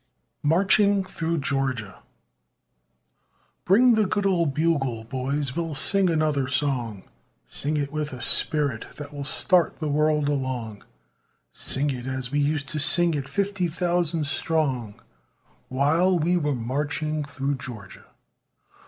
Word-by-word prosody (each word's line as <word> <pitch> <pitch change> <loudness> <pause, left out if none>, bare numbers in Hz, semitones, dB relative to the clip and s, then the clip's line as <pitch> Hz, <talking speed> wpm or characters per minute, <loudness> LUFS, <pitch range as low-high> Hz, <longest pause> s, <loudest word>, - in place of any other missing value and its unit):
MARCHING 195 +5 +3
THROUGH 165 -2 -2
GEORGIA 130 -8 -2 1.7
Bring 240 +6 +5
the 215 -2 +2
good 205 +1 -1
old 170 -6 +2
bugle, 140 -8 0
boys, 130 +3 -3
we'll 165 -3 -3
sing 195 +6 +2
another 155 -4 +1
song 130 -7 -1 0.4
Sing 150 +2 -2
it 140 -1 -2
with 150 0 -3
a 125 - -7
spirit 140 -3 +1
that 150 0 -8
will 145 -1 -5
start 175 +4 +2
the 155 -2 -3
world 150 0 +2
along 130 -7 -3 0.7
Sing 140 +2 0
it 125 -1 -6
as 130 -1 -3
we 145 - +1
used 145 0 0
to 150 - -1
sing 170 +3 +3
it 140 -3 -3
fifty 195 -2 -1
thousand 170 -2 0
strong, 140 -8 -1 0.7
While 160 +8 +2
we 170 +2 +1
were 150 -5 0
marching 150 +5 -2
through 140 0 -3
Georgia. 110 -7 -9
145 Hz, 130 wpm, -25 LUFS, 130-165 Hz, 1.7 s, Bring